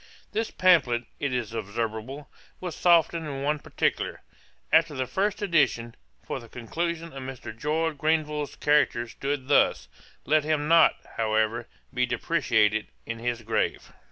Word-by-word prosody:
' - - -30
This 220 +1 -1
pamphlet, 140 -10 +3 0.2
it 140 - -1
is 120 -3 -2
observable, 115 +5 -4 0.3
was 180 -3 -5
softened 170 -2 +3
in 135 -2 -4
one 150 +1 0
particular, - - -1 0.5
after 160 -1 +4
the 130 -1 -1
first 200 +8 -1
edition; 140 - +2 0.3
for - - -4
the 115 - -13
conclusion 165 +8 -4
of 135 - -7
Mr. 130 -4 -7
George 150 +4 -1
Grenville's 150 -2 0
character 145 -5 +2
stood 135 +2 -4
thus: 145 - +3 0.4
'Let 155 0 +3
him 150 -1 0
not, 165 0 +6 0.2
however, 110 +1 0 0.3
be 125 0 +1
depreciated 110 -5 +1 0.2
in 115 0 -5
his 120 0 -2
grave. 110 - -1
140 Hz, 145 wpm, -26 LUFS, 120-160 Hz, 0.5 s, not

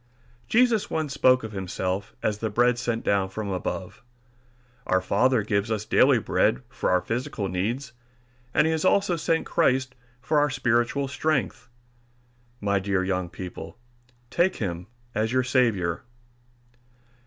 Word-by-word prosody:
Jesus 235 -3 +3
once 155 -4 -2
spoke 130 -2 +4
of 110 - -6
himself 95 0 -3
as 105 -1 0
the 110 - -2
Bread 120 +3 +2
sent 115 -2 -2
down 100 -2 +1
from 100 +1 -5
above. 90 -2 -4 0.9
Our 95 - +3
Father 110 +5 +2
gives 100 +1 0
us 110 -1 -2
daily - - +4
bread 65 - +1
for - - -2
our 90 0 +3
physical 115 -3 -3
needs, 115 +8 -3 0.6
and 150 - +3
he 160 - +2
has 160 -1 -1
also 190 -1 +3
sent 165 0 0
us - - -15
Christ 130 -5 +2 0.3
for 150 +5 +1
our 145 0 +3
spiritual 125 +1 +1
strength. 135 -4 -1 0.9
My 100 -2 +1
dear 95 -1 0
young 95 -2 -1
people, 90 +4 -8 0.5
take 185 +5 +2
him 90 -3 -4 0.3
as 110 +1 0
your 130 0 +2
Saviour. 110 -10 +1
115 Hz, 145 wpm, -25 LUFS, 100-135 Hz, 0.9 s, spoke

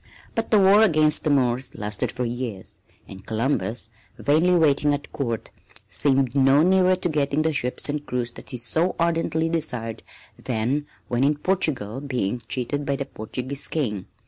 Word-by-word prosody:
But 225 - -2
the 215 - +5
war 200 +2 +6
against 155 -7 +3
the 155 - +1
Moors 130 -2 +1
lasted 105 -1 -3
for 125 - -3
years, 120 -5 -5 0.3
and 95 0 -11
Columbus, 115 -1 -2 0.3
vainly 160 +6 +3
waiting 150 -3 +3
at 145 - -9
Court, 115 -5 -3 0.4
seemed 135 -3 +2
no 135 +2 +5
nearer 185 +1 +4
to 180 - -2
getting 150 -1 0
the 160 0 +1
ships 125 -2 0
and 145 0 -3
crews 125 -4 -2
that - - -13
he 125 - -5
so 160 +9 +1
ardently 165 -1 0
desired 125 -9 -2 0.4
than 130 +5 -1 0.2
when 120 +1 0
in 145 +2 +3
Portugal 145 - -1
being 125 -5 -2
cheated 135 +4 -2
by 140 -1 -1
the 140 - -3
Portuguese 130 +4 -5
King. 105 - -2
140 Hz, 165 wpm, -24 LUFS, 120-155 Hz, 0.4 s, war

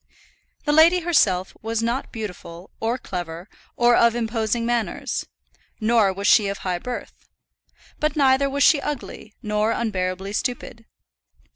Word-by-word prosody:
The 295 - +2
lady 330 +4 +6
herself 195 - +2
was 225 +1 -2
not 235 +4 -2
beautiful, 180 -5 -8
or 230 +3 -1
clever, 175 -5 -6 0.3
or 240 0 +5
of 235 0 +4
imposing 230 0 -1
manners 235 -2 -2 0.5
nor 220 -3 +3
was 200 +1 -6
she 205 -1 +5
of 200 0 -3
high 180 -2 -1
birth. 250 +6 -8 0.7
But 305 -1 0
neither 275 -1 +3
was 280 +1 +1
she 295 -3 +5
ugly, 270 -6 -6
nor 210 +1 0
unbearably 190 -3 -2
stupid. 235 -1 -4
225 Hz, 135 wpm, -23 LUFS, 200-250 Hz, 0.7 s, lady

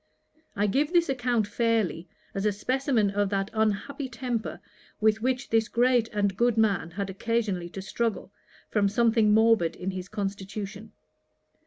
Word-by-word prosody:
I 205 0 +1
give 280 - +1
this 340 -3 +3
account 245 -4 +1
fairly, 205 -6 0 0.2
as 195 +1 0
a - - +3
specimen 245 0 0
of 205 0 0
that 195 0 -1
unhappy 220 +6 -1
temper 235 -2 -3 0.4
with 220 0 +2
which 255 +2 -1
this 225 -1 +3
great 245 -1 +3
and 200 -3 -1
good 235 +2 +2
man 200 -7 +2
had 195 +3 -4
occasionally 200 -4 -1
to 190 +2 -7
struggle, 220 -2 -2 0.4
from 205 -2 +2
something 225 0 +3
morbid 220 -6 +4
in 185 +2 -4
his 185 0 -6
constitution. 205 +1 -5
215 Hz, 150 wpm, -27 LUFS, 195-235 Hz, 0.4 s, morbid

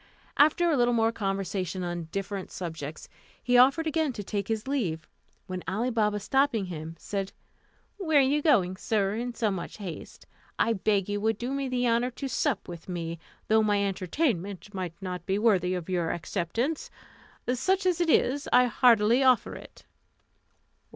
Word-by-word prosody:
After 310 +4 +4
a - - +3
little 240 -2 +3
more 225 0 +3
conversation 195 -3 -3
on 175 -1 -3
different 195 -1 -4
subjects, 160 -4 -6 0.4
he 245 +1 +2
offered 270 +6 +5
again 315 -3 0
to 210 - -6
take 200 0 -3
his 220 +1 -2
leave, 190 - -2 0.4
when 185 -1 -5
Ali 220 +8 -1
Baba, 210 -2 +1
stopping 265 -1 +1
him, 165 -2 -7
said, 195 +3 -4 0.6
"Where 320 -7 +2
are - - +8
you 280 +3 +2
going, 190 - +3
sir, 200 -1 0
in 240 +2 -4
so 220 -3 0
much 180 -3 -5
haste? 190 -6 -8 0.3
I 230 - +2
beg 200 -2 +1
you 205 0 -2
would 220 0 +1
do 245 +3 -4
me 275 -1 -2
the 250 -1 0
honour 235 +2 +2
to 270 +2 -6
sup 260 -2 -1
with 170 0 -9
me, 170 -2 -4 0.3
though 220 0 +4
my 205 -2 +2
entertainment 200 - -2
may 185 -3 -3
not 180 -2 -5
be 195 0 +1
worthy 200 -5 +3 0.2
your 175 -3 0
acceptance; 205 - -2 0.6
such 375 +10 +1
as 355 -2 +2
it 340 - +1
is, 285 -1 +2
I 250 0 +6
heartily 235 0 +4
offer 255 -3 +3
it." - - -12
215 Hz, 170 wpm, -28 LUFS, 185-255 Hz, 0.6 s, are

